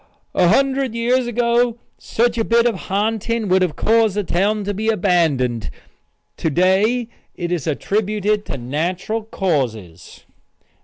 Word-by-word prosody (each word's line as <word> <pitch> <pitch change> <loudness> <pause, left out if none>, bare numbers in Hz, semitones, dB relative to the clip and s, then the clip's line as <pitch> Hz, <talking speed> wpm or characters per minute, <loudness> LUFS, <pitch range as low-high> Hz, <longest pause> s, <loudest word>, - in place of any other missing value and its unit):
"A 180 - +3
hundred 270 +3 +2
years 245 +2 +1
ago 240 0 +1 0.2
such 235 +1 0
a - - +2
bit 235 +1 +3
of 225 -6 -1
ha'nting 220 +2 -1
would 185 +1 +3
have 175 -5 0
caused 225 -2 +2
the 205 - 0
town 200 +4 0
to 205 +1 -2
be 215 +3 -1
abandoned; 160 - +1 0.7
to 160 - -1
day 195 - +2 0.3
it 175 -1 -4
is 170 -5 -2
attributed 210 +5 0
to - - -4
natural 175 - -2
causes." 120 - -3
205 Hz, 140 wpm, -20 LUFS, 175-230 Hz, 0.7 s, A